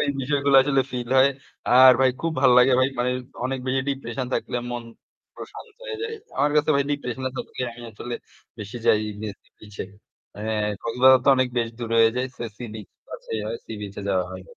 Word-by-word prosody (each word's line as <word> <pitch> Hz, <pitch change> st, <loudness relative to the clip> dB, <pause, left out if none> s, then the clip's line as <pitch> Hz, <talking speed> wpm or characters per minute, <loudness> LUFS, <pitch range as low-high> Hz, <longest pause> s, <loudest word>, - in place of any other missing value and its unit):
এই 145 Hz, -, 0 dB
বিষয়গুলো 140 Hz, +1 st, +1 dB
আসলে 135 Hz, -1 st, +2 dB
feel 120 Hz, -1 st, -4 dB
হয়। 135 Hz, +1 st, +6 dB, 0.5 s
আর 130 Hz, 0 st, +10 dB
ভাই 130 Hz, -1 st, +5 dB
খুব 165 Hz, 0 st, -1 dB
ভালো 130 Hz, -3 st, +6 dB
লাগে 125 Hz, +1 st, +5 dB
ভাই। 130 Hz, -, +3 dB
মানে 125 Hz, +1 st, +1 dB, 0.3 s
অনেক 130 Hz, +1 st, -1 dB
বেশি 130 Hz, +1 st, +1 dB
depression 135 Hz, -2 st, -3 dB
থাকলে -, -, -2 dB
মন 120 Hz, -1 st, -4 dB, 0.5 s
প্রশান্ত -, -, -10 dB, 0.2 s
হয়ে 480 Hz, -3 st, -5 dB
যায়। 450 Hz, 0 st, -3 dB, 0.2 s
আমার 145 Hz, 0 st, +2 dB
কাছে 150 Hz, +1 st, +3 dB
ভাই 140 Hz, -, +3 dB
depression 130 Hz, -3 st, -3 dB
এর -, -, -12 dB
থাকলে 125 Hz, -, -5 dB
আমি 120 Hz, -, -12 dB
আসলে 120 Hz, +3 st, -6 dB, 0.4 s
বেশি 105 Hz, +2 st, -7 dB
যাই 105 Hz, -, +5 dB, 0.2 s
নে 110 Hz, -, -3 dB, 0.3 s
বিচে 105 Hz, -1 st, -8 dB, 0.5 s
এ -, -, -7 dB, 0.4 s
কক্সবাজার 130 Hz, +2 st, +5 dB
তো -, -, +2 dB
অনেক 130 Hz, -1 st, +2 dB
বেশ 115 Hz, -1 st, 0 dB
দূরে 115 Hz, -1 st, -3 dB
হয়ে 115 Hz, 0 st, +6 dB
যায়। 125 Hz, +1 st, 0 dB
সো, -, -, -7 dB
সি-বিচ 110 Hz, -4 st, -8 dB, 0.2 s
কাছেই 110 Hz, -, -5 dB
হয়। 115 Hz, +2 st, -3 dB
সি-বিচে 105 Hz, -2 st, -7 dB
যাওয়া 95 Hz, -2 st, +1 dB
হয়। 95 Hz, 0 st, -8 dB
125 Hz, 195 wpm, -24 LUFS, 115-135 Hz, 0.5 s, আর